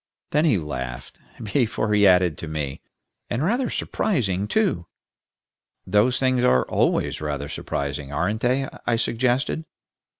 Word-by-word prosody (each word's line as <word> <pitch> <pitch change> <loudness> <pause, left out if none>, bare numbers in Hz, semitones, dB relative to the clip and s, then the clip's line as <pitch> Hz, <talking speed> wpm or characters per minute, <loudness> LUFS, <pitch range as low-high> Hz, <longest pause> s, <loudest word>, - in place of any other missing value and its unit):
Then 150 +2 +3
he 135 -10 +4
laughed, 65 -7 -6 0.2
before 110 -1 0
he 105 -1 +5
added, 90 -3 +4
to 80 - -6
me, 75 -3 -4 0.5
"And 125 - -1
rather 240 +8 +1
surprising, 105 - -1
too." 185 - 0 1.0
"Those 105 +6 +3
things 130 -2 +2
are 65 - +4
always - - +1
rather 75 -1 -3
surprising, 70 0 -4
aren't 100 +9 -1
they?" 130 +2 +1 0.2
I 120 - +3
suggested. 125 +6 0
105 Hz, 130 wpm, -24 LUFS, 75-130 Hz, 1.0 s, he